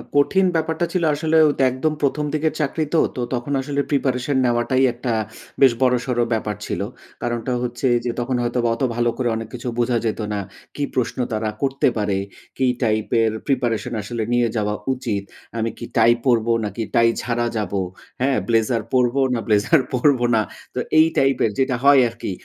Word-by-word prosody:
কঠিন 190 +7 +4
ব্যাপারটা 160 +1 0
ছিল 180 -2 0
আসলে 160 +2 +1 0.2
তো - - 0
একদম 150 +5 -1
১ম 150 +1 0
দিকের 155 0 0
চাকরি 155 +1 0
তো। 160 - +5
তো 125 - -3
তখন 125 +3 -2
আসলে 140 +1 -1
প্রিপারেশন 135 -1 0
নেওয়াটাই, 120 +2 +2
একটা 120 0 -3 0.5
বেশ 135 -2 +7
বড়সড় 125 -1 +2
ব্যাপার 105 -1 -2
ছিল। - - -3 0.4
কারণটা 120 +1 -2
হচ্ছে 120 +1 -2 0.2
যে, 120 - 0
তখন 125 +1 -1
হয়তো 120 +1 -1 0.2
অত - - -12
ভালো 120 0 +2
করে 125 -2 0
অনেক 110 0 -5
কিছু 125 0 -6
বোঝা 120 0 +2
যেত 110 - -1
না। 105 - -1 0.4
কি 145 - -2
প্রশ্ন 120 -2 -1 0.2
তারা 110 0 -1
করতে 135 0 +1
পারে, 100 -2 0 0.4
কি 130 - +2 0.2
টাইপের 110 0 +1 0.2
প্রিপারেশন 125 -3 0
আসলে 115 +2 -4
নিয়ে 120 -1 +3
যাওয়া 105 -1 0 0.2
উচিত? 115 -6 -3 0.3
আমি 115 0 0
কি 120 - -6
টাই 115 +1 +6
পড়ব, 120 -3 +3 0.2
নাকি 105 +3 -4
টাই 115 0 +5
ছাড়া 120 -1 -1
যাবো? 100 -2 -1 0.4
হ্যাঁ? 135 0 +2
ব্লেজার 115 0 +1
পড়ব 125 -1 +2 0.2
না 120 - 0
ব্লেজার 110 +8 +3
পড়ব 130 +1 +3 0.2
না? 110 - +3 0.3
তো - - -1 0.2
এই 160 - +7
টাইপের 135 -4 +3
যেটা 130 -1 +2
হয় 140 -1 +7
আরকি। 115 -3 -6
120 Hz, 175 wpm, -21 LUFS, 115-135 Hz, 0.5 s, বেশ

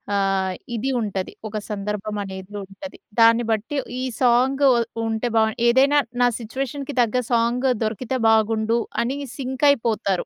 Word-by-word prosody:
ఆహ్, 195 -1 +1 0.2
ఇది 240 +4 -2
ఉంటది. 195 -3 -3 0.2
ఒక 215 0 -5
సందర్భం 210 0 -4
అనేది 190 +1 -8
ఉంటది. 195 +9 -10 0.2
దాన్ని 230 +1 +6
బట్టి 225 +7 -2 0.2
ఈ - - -2 0.2
సాంగు 260 +3 +3 0.4
ఉంటే 225 +2 -1
బాగు 220 -1 +3
ఏదైనా 270 +4 +5 0.2
నా 245 - +6
సిట్యుయేషన్‌కి 270 +4 -5
తగ్గ 240 +1 +1
సాంగ్ 235 +2 +2 0.2
దొరికితే 230 +4 -2
బాగుండు 220 +1 +2 0.2
అని 255 +4 -2 0.2
సింక్ 265 0 -2
అయిపోతారు. 225 -8 0
230 Hz, 135 wpm, -22 LUFS, 210-255 Hz, 0.4 s, దాన్ని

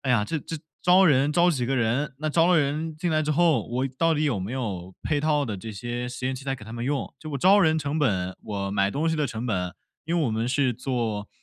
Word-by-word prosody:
哎 135 - -2
呀， 110 -4 +3
这 160 +9 -2
这 160 +3 -6 0.2
招 180 +2 +5
人， 145 -3 +4
招 175 +3 +4
几 130 -7 -1
个 135 +2 0
人？ 130 +4 0
那 155 0 -1
招 165 +2 +4
了 180 -2 +5
人 155 +2 -1
进 170 +2 -1
来 155 0 +2
之 150 - -1
后， 155 -7 +3
我 125 +3 -1
到 165 -1 +3
底 155 - 0
有 125 -10 0
没 95 +4 -4
有 95 -8 -4
配 150 -2 0
套 150 -1 +2
的 105 -6 -4
这 110 +4 -7
些 120 +4 -4
实 125 +1 -7
验 130 +1 0
器 130 - -8
材 135 0 -2
给 120 -5 -11
他 110 - -10
们 115 0 -5
用？ 140 +2 -2
就 155 - -9
我 140 - -2
招 190 +9 +5
人 160 -3 +3
成 145 +1 -2
本， 95 -10 0
我 100 -2 -3
买 100 0 +1
东 145 +8 -1
西 - - 0
的 150 -2 0
成 115 -2 -5
本 90 -7 -2 0.3
因 170 +2 0
为 155 - +2
我 - - 0
们 110 +1 -1
是 130 0 +1
做， 115 -4 -3
135 Hz, 295 characters per minute, -25 LUFS, 115-155 Hz, 0.3 s, 招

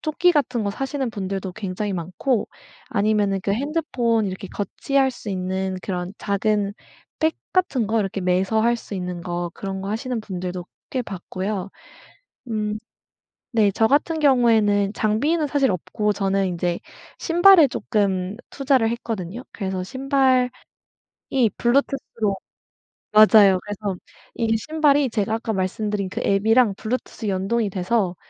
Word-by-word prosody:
조끼 345 +3 +2
같은 250 -6 0
거 200 - 0
사시는 270 +2 -3
분들도 195 -3 -4
굉장히 200 0 -3
많고 185 - -1 0.4
아니면은 205 -1 +1
그 200 - 0
핸드폰 245 -4 0
이렇게 190 0 -6
거치할 265 +7 0
수 240 - -9
있는 190 0 -2
그런 180 0 -4
작은 200 0 0 0.5
백 315 0 +2
같은 290 - +1
거 220 +1 +1
이렇게 195 -1 -2
매서 185 +4 +1
할 235 +1 +3
수 230 - -12
있는 180 -2 -4
거 175 -1 -3
그런 195 -1 -5
거 195 - -5
하시는 230 +2 -2
분들도 180 -3 -5 0.2
꽤 260 - -1
봤고요. 195 -1 -4 0.8
음. 215 -1 -2 0.7
네 220 -5 +3
저 225 - +3
같은 300 +5 +2
경우에는 220 -7 +4
장비는 290 +11 +1
사실 275 -4 +2
없고 210 +4 -1
저는 195 -1 0
인제 175 -1 -2 0.4
신발을 345 -2 +6
쪼끔 195 -2 -1
투자를 265 -5 +2
했거든요. 225 -2 -4
그래서 190 -3 -3
신발이 260 +2 +2 1.1
블루투스로 240 -5 0 0.8
맞아요. 210 -3 +7
그래서 205 -2 -4 0.4
이 225 -1 +1
신발이 290 +2 +2
제가 215 -1 -1
아까 225 0 -2
말씀드린 200 +1 -1
그 - - -4
앱이랑 215 +2 +3
블루투스 230 -1 -4
연동이 200 +3 0
돼서 185 0 0
210 Hz, 295 characters per minute, -23 LUFS, 190-250 Hz, 1.1 s, 맞아요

